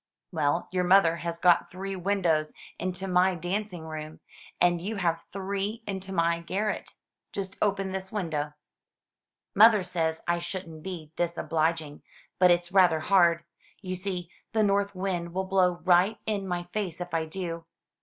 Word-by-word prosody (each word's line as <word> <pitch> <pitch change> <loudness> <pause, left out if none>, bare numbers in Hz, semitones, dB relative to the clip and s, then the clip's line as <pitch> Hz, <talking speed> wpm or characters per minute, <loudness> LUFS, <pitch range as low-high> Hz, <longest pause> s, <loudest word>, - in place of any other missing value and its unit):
"Well, 145 +4 0
your 180 -1 +1
mother 180 -2 +5
has 170 0 -4
got 175 0 +4
three 195 +2 -5
windows 175 -5 +1 0.3
into 185 +2 -3
my 180 0 +3
danc 195 +5 -2
ing 175 -3 -8
room, 155 0 -7 0.4
and 175 -1 +3
you 210 +5 -3
have 170 -4 -1
three 200 +3 -3
into 190 -1 -5
my 170 -2 +2
garret. 200 +5 -3 0.4
Just 190 -1 -5
open 195 -2 +1
this 190 0 -4
window." 160 -8 -2 1.0
"Mother 215 -1 +7
says 165 -3 -2
I 175 0 +2
shouldn't 170 -2 -6
be 165 -4 -7
disobliging; 165 -3 -1 0.4
but 180 -1 +6
it's 175 0 +2
rather 180 -5 +5
hard. 170 -2 +4 0.4
You 185 -1 -3
see 180 -2 -4 0.2
the 220 -1 +3
north 200 -1 +1
wind 180 -2 -3
will 190 - 0
blow 185 -1 +3
right 185 +4 +4
in 200 -3 -2
my 175 -1 -2
face 190 -6 -2
if 175 -1 -6
I 165 -1 +1
do." 170 -1 -5
180 Hz, 155 wpm, -28 LUFS, 170-195 Hz, 1.0 s, Mother